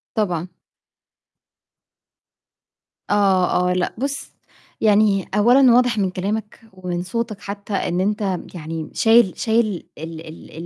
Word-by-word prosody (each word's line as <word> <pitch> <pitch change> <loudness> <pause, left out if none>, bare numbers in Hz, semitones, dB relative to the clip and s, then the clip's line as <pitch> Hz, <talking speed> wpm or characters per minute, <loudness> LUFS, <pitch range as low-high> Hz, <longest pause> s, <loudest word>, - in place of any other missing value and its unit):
طبعًا. 180 -6 -1 2.6
آه، 190 -3 +2
آه، - - +2
لأ 180 -1 -1
بُصّ، 275 +3 -4 0.5
يعني 205 -3 +3
أولًا 245 +4 +5
واضح 245 -2 +3
من 195 -2 +1
كلامك 205 +4 -4
ومن 180 -1 -4
صوتك 220 +2 -4
حتّى 200 +1 -7
إن 180 -2 -1
أنت 200 -2 -1 0.2
يعني 160 -1 -6
شايل 225 -4 +4
شايل 220 -4 0
ال 160 0 -8
ال 160 - -12
200 Hz, 115 wpm, -21 LUFS, 180-220 Hz, 2.6 s, أولًا